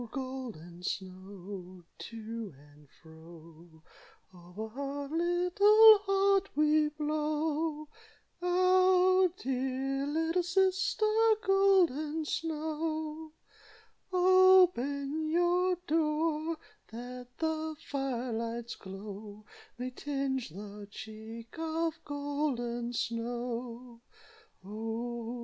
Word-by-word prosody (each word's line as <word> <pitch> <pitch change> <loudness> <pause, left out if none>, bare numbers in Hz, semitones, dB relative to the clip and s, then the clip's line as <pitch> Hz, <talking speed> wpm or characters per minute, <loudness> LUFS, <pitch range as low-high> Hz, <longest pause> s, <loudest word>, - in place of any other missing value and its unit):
Golden 245 - -7
Snow! 185 0 -7 0.2
To 225 -3 -7 0.2
and 145 -1 -21
fro; 160 0 -16 0.5
Over 180 +5 -8
her 280 +3 -5
little 400 +6 +6
heart 390 -1 +2
We 300 0 +3
blow, 305 +1 -2 0.5
Our 370 +1 +4
dear 270 +1 -2
little 325 +4 +1
sister, 385 +3 +1 0.4
Golden 345 -6 +3
Snow. 315 0 -3 0.8
"Open 355 -6 +4
your 355 +2 +2
door, 315 0 0 0.3
That 245 +2 -8
the 315 -1 -2
fire 260 -3 -2
light's 230 +1 -4
glow 205 +2 -9 0.3
May 250 +1 -4
tinge 270 - -2
the 205 +4 -9
cheek 220 +2 -10
Of 325 0 -2
Golden 285 -5 -2
Snow 235 0 -4 0.6
Oh! 225 +3 -4
280 Hz, 80 wpm, -31 LUFS, 230-325 Hz, 0.8 s, little